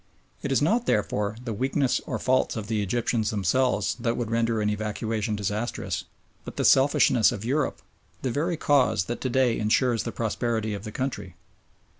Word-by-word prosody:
It 140 Hz, -, -3 dB
is 135 Hz, -, +2 dB
not, 225 Hz, +9 st, +1 dB
therefore, 105 Hz, 0 st, 0 dB
the 115 Hz, -, -2 dB
weakness 130 Hz, +3 st, 0 dB
or -, -, -2 dB
faults 130 Hz, 0 st, +1 dB
of 110 Hz, -3 st, -4 dB
the 110 Hz, -1 st, -1 dB
Egyptians 110 Hz, +1 st, 0 dB
themselves 105 Hz, 0 st, +1 dB
that 120 Hz, -1 st, -1 dB
would 115 Hz, -2 st, -3 dB
render 115 Hz, -1 st, +1 dB
an 105 Hz, -, 0 dB
evacuation 105 Hz, +1 st, -2 dB
disastrous, 105 Hz, +3 st, -3 dB, 0.4 s
but -, -, -9 dB
the -, -, 0 dB
selfishness 130 Hz, -3 st, +5 dB
of 105 Hz, -, -5 dB
Europe, 140 Hz, +4 st, -1 dB, 0.4 s
the 130 Hz, -, 0 dB
very 165 Hz, +6 st, -1 dB
cause 140 Hz, -10 st, +3 dB
that 120 Hz, -, -5 dB
to 130 Hz, -, -1 dB
day 125 Hz, -2 st, +2 dB
ensures 115 Hz, +2 st, +2 dB
the 115 Hz, -, -4 dB
prosperity 110 Hz, -1 st, -2 dB
of 100 Hz, +2 st, -6 dB
the 105 Hz, -, -6 dB
country. 125 Hz, -8 st, -4 dB
115 Hz, 175 wpm, -26 LUFS, 105-130 Hz, 0.4 s, selfishness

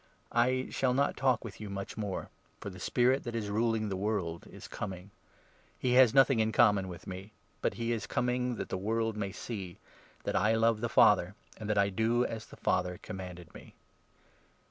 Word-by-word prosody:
I 130 Hz, +2 st, +2 dB
shall 125 Hz, -1 st, +1 dB
not 140 Hz, +1 st, +2 dB
talk 130 Hz, -3 st, +2 dB
with 105 Hz, -2 st, -9 dB
you 105 Hz, -, -6 dB
much 100 Hz, 0 st, -5 dB
more, 100 Hz, -3 st, -3 dB
30 -, -, -14 dB, 0.3 s
for -, -, -6 dB
the 90 Hz, -, -11 dB
Spirit 125 Hz, +8 st, +2 dB
that 120 Hz, -1 st, -5 dB
is 105 Hz, -3 st, -2 dB
ruling 110 Hz, 0 st, +1 dB
the 100 Hz, -, -2 dB
world 95 Hz, -4 st, -2 dB
is -, -, -10 dB
coming. 95 Hz, -1 st, -6 dB, 0.7 s
He 125 Hz, -, 0 dB
has 125 Hz, -2 st, +7 dB
nothing 135 Hz, -2 st, +5 dB
in 110 Hz, 0 st, +2 dB
common 105 Hz, -3 st, +4 dB
with 90 Hz, -1 st, -9 dB
me; 95 Hz, +3 st, -8 dB, 0.3 s
but -, -, 0 dB
he 115 Hz, 0 st, -2 dB
is 110 Hz, -3 st, -2 dB
coming 125 Hz, +1 st, 0 dB
that -, -, -5 dB
the 95 Hz, -, -2 dB
world 110 Hz, +3 st, 0 dB
31 105 Hz, -, -7 dB
may 100 Hz, -2 st, -2 dB
see 95 Hz, -4 st, -6 dB, 0.5 s
that -, -, -2 dB
I 110 Hz, +4 st, +3 dB
love 115 Hz, -1 st, +2 dB
the 120 Hz, -, -1 dB
Father, 100 Hz, -3 st, +5 dB, 0.2 s
and 105 Hz, -1 st, -6 dB
that 105 Hz, -, +1 dB
I 100 Hz, 0 st, +4 dB
do 115 Hz, +5 st, +1 dB
as 110 Hz, -1 st, -5 dB
the -, -, -13 dB
Father 90 Hz, -1 st, 0 dB
commanded 90 Hz, -4 st, -8 dB
me. -, -, -13 dB
110 Hz, 205 wpm, -31 LUFS, 95-120 Hz, 0.7 s, has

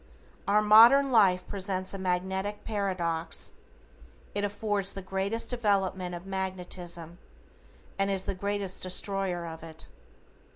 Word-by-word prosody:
Our 210 Hz, +1 st, +4 dB
modern 235 Hz, +6 st, +7 dB
life 195 Hz, -6 st, +4 dB
presents 190 Hz, -1 st, -3 dB
a 195 Hz, -, -5 dB
magnetic 190 Hz, +2 st, -2 dB
paradox, 185 Hz, -6 st, -2 dB, 0.8 s
it 205 Hz, -, -1 dB
affords 205 Hz, -1 st, 0 dB
the 195 Hz, -, -7 dB
greatest 195 Hz, +5 st, -1 dB
development 195 Hz, -6 st, 0 dB
of 175 Hz, +2 st, -9 dB
magnetism 180 Hz, -3 st, -4 dB, 0.8 s
and 195 Hz, 0 st, +3 dB
is 195 Hz, -1 st, 0 dB
the -, -, -2 dB
greatest 200 Hz, 0 st, -2 dB
destroyer 185 Hz, -1 st, -1 dB
of 160 Hz, -1 st, -8 dB
it. 160 Hz, -1 st, -9 dB
190 Hz, 120 wpm, -29 LUFS, 180-205 Hz, 0.8 s, modern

